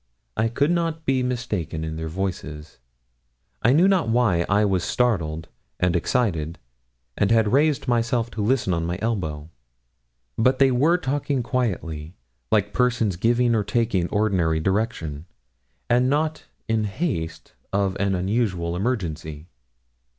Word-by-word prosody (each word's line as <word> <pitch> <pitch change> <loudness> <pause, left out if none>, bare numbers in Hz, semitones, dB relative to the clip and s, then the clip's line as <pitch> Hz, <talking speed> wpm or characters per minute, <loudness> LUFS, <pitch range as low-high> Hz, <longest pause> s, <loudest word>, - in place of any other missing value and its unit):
I 110 - +1
could 140 +7 +1
not 165 -2 -1
be 130 -1 +2
mistaken 115 -11 -2
in 80 0 -4
their 80 0 -4
voices. 80 -4 -5 0.8
I 120 - +4
knew 165 +7 +5
not 185 -11 +2
why 110 -8 +2
I 105 +1 +3
was 95 -3 +1
startled 80 -11 0 0.3
and 90 -1 +2
excited, 85 - 0 0.6
and 100 - +1
had 110 -2 +3
raised 145 0 +2
myself 120 -1 +1
to 110 - -4
listen 110 -3 +1
on 85 -1 -1
my 85 +1 -2
elbow. 80 -9 -3 0.9
But 130 +3 +3
they 135 -1 +5
were 150 +8 +3
talking 140 -3 -1
quietly, 90 - -2 0.4
like 105 -1 +2
persons 120 -6 +1
giving 120 +5 +2
or 110 -2 +2
taking 115 -3 +1
an - - -5
ordinary 95 -7 +1
direction, 90 -5 -2 0.6
and 125 +2 +3
not 155 +2 0 0.2
in 110 -1 +1
the 105 - -1
haste 95 - -3 0.2
of 100 -1 0
an 100 -1 +1
unusual 95 -3 -1
emergency. 85 -7 -3
105 Hz, 145 wpm, -24 LUFS, 85-125 Hz, 0.9 s, knew